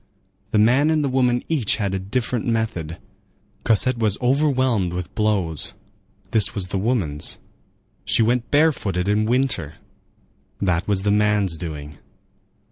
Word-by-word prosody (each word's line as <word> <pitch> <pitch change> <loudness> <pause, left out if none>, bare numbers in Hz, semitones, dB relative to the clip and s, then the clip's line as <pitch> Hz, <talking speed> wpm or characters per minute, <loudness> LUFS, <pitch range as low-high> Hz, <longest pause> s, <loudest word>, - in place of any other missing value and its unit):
The - - 0
man 125 +8 +4
and 155 -1 +2
the 140 - 0
woman 125 -2 +2
each 140 -11 +1
had 100 -3 -2
a 95 - -1
different 115 +4 -2
method: 110 -9 -2 0.7
Cosette 115 +3 +2
was 105 -3 +1
overwhelmed 130 - +1
with 90 +1 -5
blows—this 100 +1 -2
was 95 -3 -2
the 95 - -1
woman's; 95 - -1 0.7
she 115 - +2
went 120 +1 0
barefooted 120 - +1
in 105 +1 +2
winter—that 95 - -3
was 100 -2 +1
the 100 - +2
man's 105 -3 +2
doing. 75 -3 -7
105 Hz, 125 wpm, -22 LUFS, 90-125 Hz, 0.7 s, man